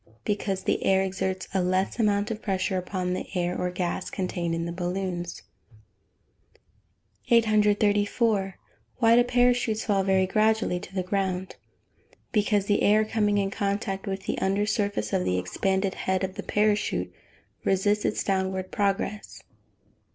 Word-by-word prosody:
_ - - -26
Because 200 -2 -1
the - - 0
air 190 0 +3
exerts 190 -1 -3
a 190 - +2
less 185 +4 0
amount 205 0 +1
of 220 0 -5
pressure 190 -1 -1
upon 180 0 -3
the - - -4
air 175 0 0
or 180 - -1
gas 180 0 -3
contained 175 -3 -2
in 165 0 -2
the 170 - -3
balloons. 175 0 -4 1.9
834. 210 -2 +2 0.4
Why 230 -1 +5
do 240 - +6
parachutes 245 -3 +2
fall 200 -2 +2
very 190 -1 +3
gradually 215 -1 +1
to 190 0 -11
the 185 - 0
ground? 190 -1 -2 0.8
Because 210 -2 +2
the 205 0 +1
air, 215 +1 +4
coming 210 -1 +1
in 195 -1 0
contact 200 0 -2
with 195 0 -3
the - - -2
under 195 +2 +1
surface 200 - -1
of - - +2
the 90 0 0
expanded 190 - 0
head 190 0 -1
of 190 0 -2
the - - -6
parachute 210 0 0 0.5
resists 205 +2 +2
its - - 0
downward 190 -1 -1
progress. 205 +1 -2
195 Hz, 150 wpm, -26 LUFS, 185-210 Hz, 1.9 s, do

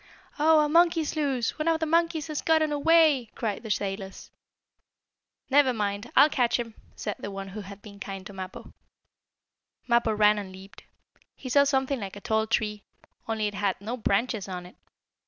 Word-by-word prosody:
"Oh, 310 +1 +5
a 300 - +2
monkey's 330 0 +3
loose! 275 -4 -1
One 305 - -1
of 325 -1 +2
the 320 - 0
monkeys 330 -1 +1
has 305 -2 -4
gotten 315 -1 +2
away!" 295 -4 +4
cried 215 -4 -3
the 220 - -8
sailors. 195 -1 -4 1.2
"Never 275 -2 +4
mind! 205 +1 -3
I'll 280 +3 +8
catch 250 -6 +1
him!" 230 -2 -5 0.2
said 210 - -4
the - - -6
one 195 0 -7
who 210 +3 -7
had 200 +1 -11
been 200 -2 -12
kind 195 -2 -7
to 200 - -9
Mappo. 185 -1 -8 1.1
Mappo 235 -2 +2
ran 210 0 +4
and 195 -2 -7
leaped. 190 +1 -14 0.5
He 260 - -8
saw 280 +2 +5
something 270 -1 0
like 200 -2 -6
a - - -8
tall 220 +1 0
tree, 210 -2 -1 0.5
only 220 -1 -1
it 205 - -2
had 200 -1 -1
no 220 +5 -4
branches 220 -2 -1
on 180 -1 -6
it. 180 - -14
225 Hz, 180 wpm, -27 LUFS, 200-290 Hz, 1.2 s, I'll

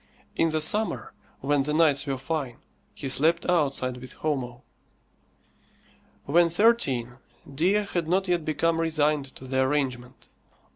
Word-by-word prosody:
In 165 - +2
the 155 0 -1
summer, 155 - 0 0.3
when 145 +1 +1
the 150 +2 -1
nights 145 -3 +3
were 135 -1 -1
fine, 135 -2 -4 0.4
he 140 - -6
slept 155 +5 +1
outside 140 -7 0
with 125 +1 -10
Homo. 130 -5 -3 1.6
When 170 +4 +4
thirteen, 150 - +1 0.3
Dea 170 +8 +2
had 175 -4 -2
not 190 +3 +1
yet 175 -2 +1
become 165 +2 0
resigned 155 -3 +1
to 130 - -10
the 130 0 0
arrangement. 130 -3 -2
150 Hz, 135 wpm, -26 LUFS, 130-165 Hz, 1.6 s, When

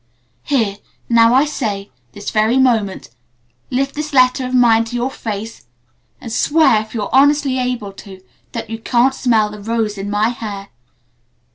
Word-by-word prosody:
Here 220 - 0 0.3
now, 230 0 +5
I 270 +3 +5
say 210 -9 -4 0.2
this 205 - -6
very 220 +4 +2
moment: 225 - +1 0.6
Lift 275 +2 -1
this 300 0 -5
letter 255 0 +3
of 255 - -6
mine 230 -2 +5
to 230 - -7
your 245 +2 -1
face, 215 - -6 0.5
and 230 - -7
swear 295 -8 +3
if 220 +2 -11
you're 210 -3 -4
honestly 280 -1 +3
able 245 -6 -3
to 195 -1 -12 0.3
that 225 - -6
you 225 - -4
can't 245 +3 +2
smell 220 -5 +1
the 210 - -9
rose 220 -1 -2
in 200 +1 -4
my 210 +2 +1
hair! 205 -4 -6
230 Hz, 160 wpm, -17 LUFS, 210-255 Hz, 0.6 s, now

